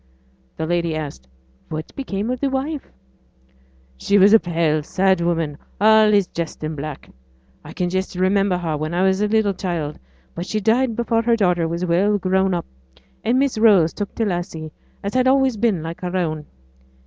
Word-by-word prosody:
The 160 - -2
lady 170 -1 0
asked, 145 - -6 0.4
'What 155 0 -6
became 220 -4 -3
of 255 - -3
the 280 - 0
wife?' 270 +2 -3 1.1
'She 200 - +2
was 200 +2 +6
a 225 - +8
pale, 165 -4 0
sad 190 +3 +1
woman, 165 -4 -1 0.2
allays 215 -1 +5
dressed 170 -3 -6
in 155 +1 -3
black. 150 0 -7 0.5
I - - -10
can 180 - -1
just 185 +1 -2
remember 190 0 +2
her 165 -3 -2
when 155 +3 -3
I 180 - +2
was 190 +1 +2
a 210 - +2
little 215 -2 +2
child, 170 -6 -4 0.3
but 175 +3 -6
she 215 - -1
died 230 +3 +2
before 230 -1 +1
her 235 0 +2
daughter 180 -6 +1
was 170 +2 -2
well 190 +5 +2
grown 190 0 +1
up; 170 - -3 0.6
and 240 +3 +2
Miss 270 -4 +1
Rose 200 -8 +5
took 205 -2 -5
t' 225 - 0
lassie, 175 -4 -4 0.3
as 200 +1 -3
had 255 0 +2
always 265 -2 +3
been 210 -7 0
like 165 +3 -7
her 180 0 -2
own.' 155 -4 -2
185 Hz, 185 wpm, -21 LUFS, 170-215 Hz, 1.1 s, a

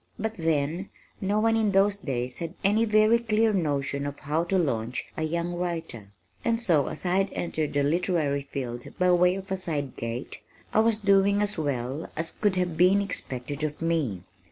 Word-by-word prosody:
But 220 +1 -2
then, 165 +2 -1 0.3
no 205 +2 +1
one 225 +1 +3
in 215 -3 +2
those 200 +1 +4
days 125 -8 -3
had 170 +1 -5
any 210 +3 +3
very 215 +1 +4
clear 220 -1 +2
notion 145 -5 -1
of 145 0 -6
how 155 +3 -1
to 190 +2 +1
launch 125 -8 -1
a - - -4
young 170 +2 -1
writer, 170 - -4 0.4
and 230 -1 +1
so 170 - +2
(as - - -5
I 180 +1 +2
had 195 0 +2
entered 155 -3 -2
the 145 0 +2
literary 150 -3 0
field 120 -3 -5
by 180 0 +3
way 180 +1 +4
of 195 0 -7
a 190 - 0
side 150 -7 -3
gate) 115 +3 -5 0.3
I - - +4
was 225 0 +3
doing 200 -1 +3
as 210 0 -1
well 140 0 -2
as 165 +1 -2
could 205 -3 0
have 180 -3 -1
been 185 +4 +5
expected 145 -7 -4
of 150 -1 -2
me. 155 - -1
170 Hz, 190 wpm, -27 LUFS, 145-200 Hz, 0.4 s, been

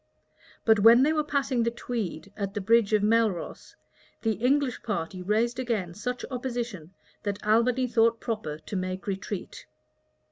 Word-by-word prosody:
But 220 -2 +5
when 230 +4 +7
they 305 +3 +3
were 305 -1 +1
passing 275 -4 0
the 230 - +2
Tweed 215 -6 -5
at 200 0 -4
the - - 0
bridge 220 +1 +3
of 210 -1 +3
Melross, 220 -4 0 0.5
the 225 - +2
English 250 +5 +1
party 185 -4 -3
raised 225 +6 0
again 220 -9 -2
such 245 +6 -4
opposition, 240 -9 -4 0.3
that 205 0 -4
Albany 235 +4 +3
thought 230 -1 +2
proper 215 -10 -4
to 160 - -8
make 185 0 -3
a 200 - -2
retreat. 195 0 -6
225 Hz, 155 wpm, -27 LUFS, 200-245 Hz, 0.5 s, when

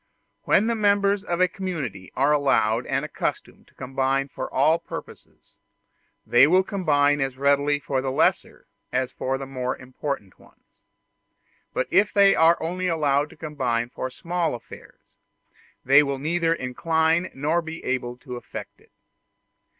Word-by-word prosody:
When 205 - +4
the 235 - +1
members 200 -2 +2
of 175 -3 -2
a 185 - +5
community 155 - -5
are 140 +3 +2
allowed 125 -5 +2
and 135 +2 -1
accustomed 150 - -5
to - - -27
combine 135 +1 -1
for - - -6
all 155 +5 +3
purposes, - - -11 0.7
they 125 +3 +6
will 185 +4 +4
combine 145 -8 +1
as 135 -1 -2
readily 140 +1 +2
for 135 -2 -2
the 135 - -2
lesser 130 - 0 0.3
as 130 0 -1
for 135 +1 -2
the 135 - -6
more 130 -1 -3
important 130 -5 -6
ones; - - -23 1.1
but - - -1
if 205 +1 +4
they 200 -2 +6
are 165 +1 +5
only 180 +3 -2
allowed 150 -3 +1
to - - -16
combine 125 -7 -2
for 130 - -4
small 170 +2 -2
affairs, 120 - -14 0.7
they 140 +3 +7
will 140 -2 -2
be 135 - -10
neither 165 +1 +1
inclined 160 +6 0
nor 155 +5 0
able 130 -6 -3
to 125 -1 -8
effect - - -9
it. - - -25
145 Hz, 150 wpm, -24 LUFS, 130-170 Hz, 1.1 s, they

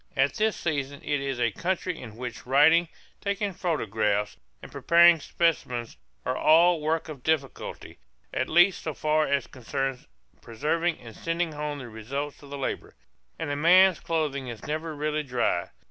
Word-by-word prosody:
At 135 +1 +3
this 220 0 +1
season 140 -3 -2
it 145 -2 -1
is 135 -2 -3
a 120 -2 +2
country 180 - -2
in 110 -4 -10
which 120 -1 -7
writing, 155 +6 +5 0.4
taking 200 0 -1
photographs, 105 - -1 0.3
and - - -10
preparing 170 0 +5
specimens 125 -8 -1 0.3
are 130 - 0
all 165 +3 +5
works 160 +2 -1
of 150 -5 -8
difficulty, 150 -2 -3 0.3
at 130 - -1
least 175 +3 +4
so 155 - -4
far 155 0 +1
as 140 0 +1
concerns 130 +1 -4 0.3
preserving 155 +8 -1
and 115 -2 -12
sending 165 0 -2
home 150 -1 -4
the 130 -3 -8
results 135 +6 -5
of 140 - -13
the 140 - -6
labor; 135 - -4 0.4
and 160 -3 -3
a - - -1
man's 180 +4 +5
clothing 150 -5 -2
is 115 -3 -8
never 155 +1 -3
really 150 +1 -1
dry. 125 -10 -1
150 Hz, 160 wpm, -27 LUFS, 130-165 Hz, 0.4 s, writing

